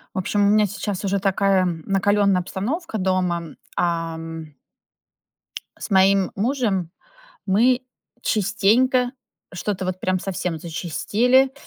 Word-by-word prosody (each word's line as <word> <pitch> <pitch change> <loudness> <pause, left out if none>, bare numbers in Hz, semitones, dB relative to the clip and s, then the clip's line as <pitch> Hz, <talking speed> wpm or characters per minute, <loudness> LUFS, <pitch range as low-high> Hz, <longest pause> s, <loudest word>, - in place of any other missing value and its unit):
В - - -4
общем, 200 +2 +1
у - - +4
меня 210 0 +4
сейчас 205 -1 -4
уже 200 0 0
такая 195 -1 +2
накалённая 195 +3 +1
обстановка 220 - -3
дома. 180 -4 -1 0.2
Ам. 165 -2 -3 1.2
С - - -7
моим 190 0 +4
мужем 210 - 0 0.6
мы 240 +6 +3 0.4
частенько, 240 +5 +2 0.4
что-то 185 +1 -3
вот 185 0 -3
прям 185 0 0
совсем 180 -3 -3
зачастили, 230 - +1
195 Hz, 110 wpm, -22 LUFS, 180-215 Hz, 1.2 s, у